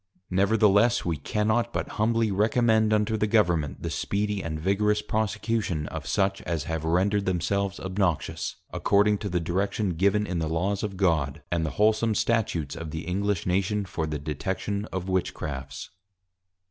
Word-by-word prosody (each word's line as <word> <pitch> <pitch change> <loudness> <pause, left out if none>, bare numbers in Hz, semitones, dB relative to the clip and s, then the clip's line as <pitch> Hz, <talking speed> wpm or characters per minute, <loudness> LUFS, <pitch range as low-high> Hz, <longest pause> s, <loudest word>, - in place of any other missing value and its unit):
_Nevertheless, 105 +4 +3
We 85 -3 0
cannot 110 +9 0
but - - -3
humbly 115 0 +1
recommend 110 +2 +3
unto 105 +1 +2
the 110 - +1
Government, 85 -9 +1
the - - -2
speedy 105 0 -1
and 80 -3 -4
vigorous 105 +4 +2
Prosecution 105 -6 -1
of 75 -2 -6
such 95 -1 +1
as 80 -4 -2
have 80 -1 -3
rendered 95 +5 +1
themselves 95 +2 0
obnoxious, 95 -3 -1 0.2
according 105 0 +3
to 105 - -4
the 90 -1 0
Direction 95 +4 -1
given 100 +5 +2
in 90 -4 -2
the 80 -1 -1
Laws 95 +5 0
of 100 -3 -4
God, 80 -6 +1
and 85 -2 +1
the 80 - -1
wholesome 110 +1 +3
Statutes 100 -12 0
of 85 -1 -6
the 80 +1 -4
+English+ 100 +1 -1
Nation, 100 +3 0
for 80 -3 -3
the 75 -1 -2
Detection 95 +7 -3
of 95 -3 -5
Witchcrafts. 70 -7 -3
95 Hz, 160 wpm, -26 LUFS, 85-105 Hz, 0.2 s, Nevertheless